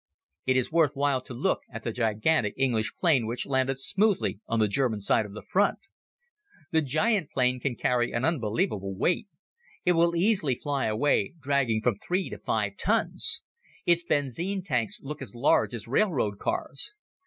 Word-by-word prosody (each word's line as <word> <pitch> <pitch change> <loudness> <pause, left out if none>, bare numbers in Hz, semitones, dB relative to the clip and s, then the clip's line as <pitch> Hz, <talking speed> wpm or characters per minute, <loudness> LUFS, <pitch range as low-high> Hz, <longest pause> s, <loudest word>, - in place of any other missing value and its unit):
It 130 0 +3
is 130 - 0
worth 160 -3 +3
while 140 -2 +1
to 130 - -10
look - - 0
at - - -7
the - - -2
gigantic 115 +1 +1
English 120 -5 +1
plane 145 -10 +3
which 120 +2 -2
landed 130 -1 0
smoothly 195 - +1
on 115 - 0
the 110 - +4
German 110 0 0
side 105 +2 +1
of 100 - -13
the 105 - -8
front. 205 +2 +2 0.9
The 160 - +3
giant 155 - +1
plane 125 -1 +1
can 125 0 -2
carry 125 -1 +1
an 120 +2 -1
unbelievable 105 - -1
weight. 175 - 0 0.6
It 180 - +5
will 170 0 +3
easily 170 - +2
fly 140 +1 -2
away 110 +2 +1
dragging 135 -6 +1
from 115 -5 +1
three 185 +2 -2
to - - -7
five - - -1
tons. 320 0 +2 0.4
Its 170 0 +3
benzine 170 - -1
tanks 125 - -1
look 150 +1 -6
as 130 - -8
large 125 +3 +3
as 120 -2 -6
railroad 125 - +1
cars. 140 - -2
135 Hz, 170 wpm, -27 LUFS, 115-165 Hz, 0.9 s, It